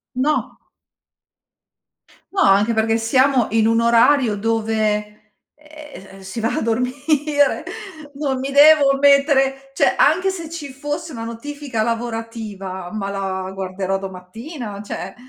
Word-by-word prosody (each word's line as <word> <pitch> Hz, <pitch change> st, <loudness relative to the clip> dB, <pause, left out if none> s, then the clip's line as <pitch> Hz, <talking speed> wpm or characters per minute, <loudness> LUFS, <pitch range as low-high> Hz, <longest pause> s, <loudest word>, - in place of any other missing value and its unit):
No. 295 Hz, +4 st, -1 dB, 1.7 s
No, 390 Hz, -, -1 dB
anche 200 Hz, +4 st, +4 dB
perché 225 Hz, 0 st, +1 dB
siamo 255 Hz, +1 st, +2 dB
in 220 Hz, -1 st, +2 dB
un 230 Hz, +1 st, +3 dB
orario 235 Hz, 0 st, +4 dB
dove, 215 Hz, -1 st, -2 dB, 0.2 s
ehm, 300 Hz, -10 st, -13 dB
si 195 Hz, +4 st, -7 dB
va 225 Hz, +1 st, -1 dB
a -, -, -1 dB
dormire. 285 Hz, +5 st, 0 dB, 0.5 s
Non 275 Hz, -2 st, -2 dB
mi 270 Hz, +1 st, -4 dB
devo 285 Hz, -1 st, +6 dB
mettere 275 Hz, -1 st, +3 dB
cioè, -, -, +2 dB
anche 365 Hz, +6 st, +3 dB
se 335 Hz, -4 st, -5 dB
ci 300 Hz, -5 st, -7 dB
fosse 295 Hz, +4 st, -5 dB
una 225 Hz, -3 st, -6 dB
notifica 255 Hz, +1 st, -5 dB
lavorativa, 225 Hz, -5 st, -4 dB
ma 200 Hz, -2 st, -4 dB
la 190 Hz, -1 st, -4 dB
guarderò 190 Hz, 0 st, -3 dB
domattina, 200 Hz, -, -8 dB
cioè 195 Hz, 0 st, -7 dB
230 Hz, 120 wpm, -20 LUFS, 210-285 Hz, 1.7 s, devo